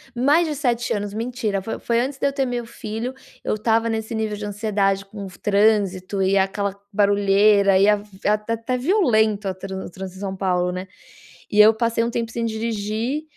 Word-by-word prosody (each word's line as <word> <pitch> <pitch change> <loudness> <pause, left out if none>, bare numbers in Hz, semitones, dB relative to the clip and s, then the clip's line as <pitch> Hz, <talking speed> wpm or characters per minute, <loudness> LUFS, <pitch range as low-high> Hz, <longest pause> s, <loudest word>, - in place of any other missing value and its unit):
mais 290 +8 +3
de 305 - -2
7 240 -4 0
anos 205 -1 -3
mentira, 225 -3 -2
foi 225 +4 -5
foi 235 0 0
antes 270 +2 -3
de 280 - +2
eu 275 - -1
ter 275 -1 0
meu 245 -1 -3
filho. 225 +2 -5 0.3
Eu - - 0
estava 225 +1 +1
nesse 220 0 -3
nível 220 -1 -2
de 210 - -5
ansiedade, 200 -2 0
com 200 0 -9
o - - -7
f 180 - -16
trânsito 200 -2 +1
e 190 +1 +3
aquela 195 +1 0 0.2
barulheira 200 -1 +4
e 200 - +5
até 210 +3 0
violento 220 - +2
a 190 - -1
tran 190 0 -6
o - - -7
trânsito 190 +1 -8
em - - -10
São 195 -1 -3
Paulo, 180 -2 0
né? 185 +1 -5 0.6
E 210 - +1
eu 220 +1 +7
passei 230 0 0
um 235 - -1
tempo 230 -1 -3
sem 235 0 -3
dirigir. 225 +5 -2
210 Hz, 200 wpm, -22 LUFS, 195-230 Hz, 0.6 s, eu